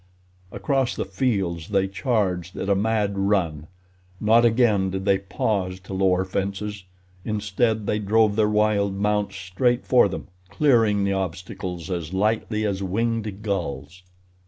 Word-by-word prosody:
Across 135 -4 0
the - - -2
fields 95 -10 -1
they 95 -2 +1
charged 95 -5 -1
at 100 - -3
a - - +5
mad 100 -1 0
run. 90 -7 0 0.5
Not 115 +2 +4
again 110 -5 +3
did 95 +1 -4
they 100 -1 +3
pause 95 -1 -2
to 95 +1 -9
lower 95 -1 +2
fences, 100 +1 -4 0.4
instead, 110 +1 0
they 105 - 0
drove 105 0 +2
their 105 -1 +3
wild 105 -2 +2
mounts 105 0 0
straight 95 +7 0
for 125 -5 +5
them, 95 - -6 0.2
clearing 110 -3 +3
the 100 0 +1
obstacles 90 -1 -4
as 85 -1 -4
lightly 110 +1 0
as 100 -2 -1
winged 105 +1 -2
gulls. 90 -5 -4
100 Hz, 140 wpm, -24 LUFS, 95-110 Hz, 0.5 s, a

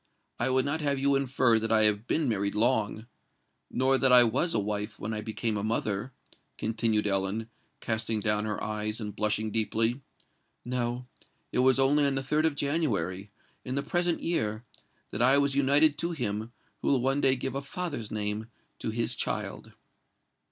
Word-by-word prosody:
I 120 - +1
would 130 0 +2
not 150 +3 -1
have 140 -2 0
you 140 +1 +2
infer 130 -4 +2
that 115 +1 -3
I 110 -1 +4
have 105 +2 +4
been 155 -3 0
married 100 -3 -1
long—nor 120 +3 -1
that 130 -1 +4
I 125 -1 +9
was 130 +9 0
a - - +2
wife 105 +1 -3
when 110 +2 -4
I 105 - -3
became 110 0 -2
a 100 - -3
mother," 110 +1 -2 0.5
continued 110 -1 0
Ellen, 100 +3 -1 0.3
casting 110 -1 -1
down 105 0 +1
her 105 -1 -3
eyes, 105 +1 -2
and 105 -2 -6
blushing 110 0 0
deeply. 115 +4 +1 0.6
"No—it 125 0 -5
was 130 0 +4
only 140 +2 +3
on 140 - -1
the 135 - -1
3d 150 +4 +1
of 155 - -2
January, 105 - -1 0.3
in 130 - -4
the 140 - -1
present 175 -1 0
year, 110 -10 -2 0.5
that 105 - -3
I 130 +3 +6
was 140 -1 +2
united 145 +2 +4
to 170 +1 0
him 110 -5 -3 0.3
who - - -3
will 135 - +3
one 135 +3 +1
day 135 -1 +4
give 130 0 -4
a 140 - -3
father's 140 -6 -5
name 105 +1 -3 0.3
to - - -3
his 115 +1 -1
child." 115 - -4
120 Hz, 175 wpm, -28 LUFS, 105-135 Hz, 0.6 s, I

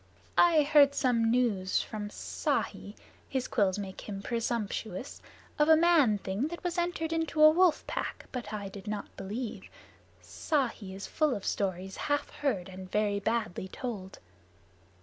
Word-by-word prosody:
"I 330 -3 +6
heard 285 -1 +5
some 235 -4 +2
news 225 -6 +2
from 210 -1 -5
Ikki - - -3 0.3
(his 260 -2 -1
quills 195 -4 +1
make 195 0 -7
him 200 -1 -5
presumptuous) 230 -1 -3 0.4
of 300 +1 +4
a 320 - +9
man 315 -10 +5
thing 200 +7 -2
that 345 +2 -7
was 355 0 -1
entered 340 -2 -1
into 325 -1 -1
a 310 0 +9
wolf 350 -1 +3
pack, - - -4
but 240 -5 -5
I 205 -2 -4
did 195 +1 -10
not 210 -1 -5
believe. 220 +4 -5 0.9
Ikki 235 -10 0
is 195 - -6
full 305 -4 +1
of 200 - -6
stories 190 -1 -2
half 290 -1 -1
heard 210 -12 -1
and 185 0 -10
very 210 -1 +1
badly 220 -3 -1
told." 195 -4 -6
230 Hz, 150 wpm, -30 LUFS, 200-295 Hz, 0.9 s, a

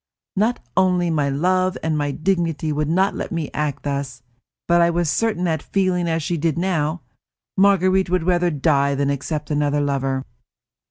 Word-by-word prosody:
Not 220 +5 +1 0.2
only 180 -2 +2
my 145 -3 +1
love 185 +6 +1
and 160 -1 0
my 145 -1 0
dignity 165 -1 -1
would 150 0 -1
not 190 +4 +2
let - - -5
me 165 -4 -3
act 150 -2 -2
thus, 140 -3 -4 0.4
but 170 0 +4
I 170 - +4
was 170 -2 0
certain 220 -4 0
that, 160 -4 0
feeling 185 -3 0
as 165 -1 -1
she 170 +3 -1
did 160 0 0
now, 170 -3 -1 0.5
Marguerite 190 -1 +3
would 180 -2 +1
die 160 -5 +2
rather 140 - 0
than 140 0 0
accept 150 +2 -4
another 145 0 +1
lover. 135 -2 -1
165 Hz, 170 wpm, -21 LUFS, 145-180 Hz, 0.5 s, but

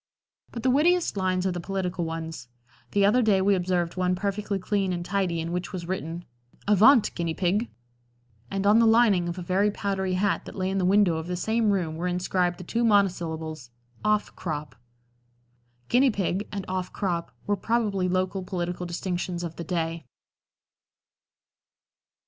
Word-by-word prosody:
But 235 - -6
the 255 - +3
wittiest 335 +4 +3
linings 185 -1 0
are 190 - +1
the 175 - -4
political 185 -1 -3
ones. 160 -5 -5 0.5
The 200 -1 +4
other 230 +5 +4
day 210 -4 +3
we 200 +1 +3
observed 180 -2 0
one 180 0 +1
perfectly 200 +1 -2
clean 195 0 -1
and 175 0 -4
tidy 185 -4 0
in 165 +1 -3
which 180 +1 -3
was 175 -3 -6
written: 170 -1 -4 0.4
"Avaunt! 215 +4 +6
Guinea 170 -2 -2
Pig," 195 +6 0 0.8
and 195 0 -2
on 210 +3 +6
the 230 - +5
lining 220 -6 +4
of 170 - -5
a 180 - -5
very 190 +4 +2
powdery 195 -2 -2
hat 200 +2 0
that - - -9
lay 185 0 -1
in 195 - 0
the 185 - +1
window 190 -3 +4
of 160 +1 -5
the 180 - -2
same 220 +4 +1
room 175 -6 0
were 175 +2 -2
inscribed 180 0 0
the - - -8
two 230 +7 -1
monosyllables 160 - 0 0.3
"Off 210 0 +1
crop." 150 -3 -5 1.1
"Guinea 260 +2 +4
pig" 200 -2 -1
and 200 -2 -4
"Off 185 -1 -3
crop" 175 -7 -2
were 205 - +1
probably 205 -3 0
local 185 +1 0
political 180 -1 -4
distinctions 175 0 -3
of 165 -2 -5
the 170 - -4
day. 165 -4 -3
185 Hz, 170 wpm, -26 LUFS, 175-205 Hz, 1.1 s, Avaunt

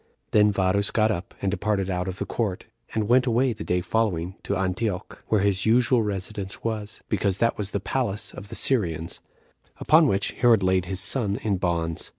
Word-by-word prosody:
Then 105 0 +4
Varus 100 +1 +1
got 110 -1 +2
up, 90 -4 -5
and 95 - +1
departed 100 -2 -1
out 90 0 -2
of 95 0 -4
the - - -3
court, 105 -6 -3 0.3
and 110 -2 0
went 125 +2 +3
away 120 +1 +2
the 105 - -8
day 90 +2 0
following 90 -2 -1
to 100 - -2
Antioch, 95 +1 -3
where 110 -3 +2
his 100 0 +1
usual 120 +1 +4
residence 100 -1 -4
was, 110 -2 -4
because 100 -2 0
that 115 +2 +1
was 100 -2 -3
the 100 - -2
palace 105 -1 -3
of 100 0 -10
the - - -7
Syrians; 85 - +1 0.6
upon 155 0 +4
which 95 -6 0
Herod 115 -5 +3
laid 95 -1 +2
his 95 0 0
son 100 -1 +4
in 100 -3 0
bonds. 85 -3 -2
100 Hz, 190 wpm, -24 LUFS, 95-110 Hz, 0.6 s, Then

